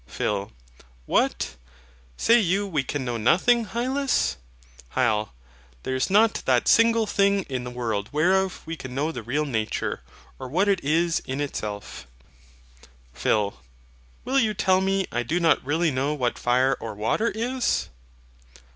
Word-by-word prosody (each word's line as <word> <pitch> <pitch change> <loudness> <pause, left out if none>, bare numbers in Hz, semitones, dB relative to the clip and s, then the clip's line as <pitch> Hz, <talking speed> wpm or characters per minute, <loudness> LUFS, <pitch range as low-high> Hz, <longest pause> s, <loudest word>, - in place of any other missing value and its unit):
PHIL. 100 -1 -2 0.5
What! 65 - 0 0.6
Say 235 +1 +5
you 200 0 +1
we 155 -8 -1
can 130 0 -4
know 120 -1 -2
nothing, 225 - +3
Hylas? 260 - 0 0.6
HYL. 110 -4 +1 0.5
There - - -3
is 130 - 0
not 215 +3 +3
that 125 -2 +2
single 230 0 +4
thing 200 -1 +2
in 130 -5 -4
the - - -5
world 115 -4 -3
whereof 185 +5 +1
we 165 +1 -4
can 130 -5 -8
know 150 +4 0
the 125 - -6
real 140 +7 -1
nature, 110 - -2 0.4
or 130 - -6
what 180 +10 +1
it 195 -3 +1
is 165 +4 +1
in 130 +2 -3
itself. 105 - -5 1.1
PHIL. 100 - 0 0.6
Will 270 +2 +2
you 215 -4 +1
tell 185 0 +2
me 195 0 +1
I 120 - -1
do 155 +9 -1
not 165 -2 +3
really 160 +4 +1
know 140 +3 -1
what 125 -4 -1
fire 130 +2 +2
or 110 -2 -6
water 115 - 0
is? 245 +3 -1
150 Hz, 150 wpm, -25 LUFS, 125-200 Hz, 1.1 s, Say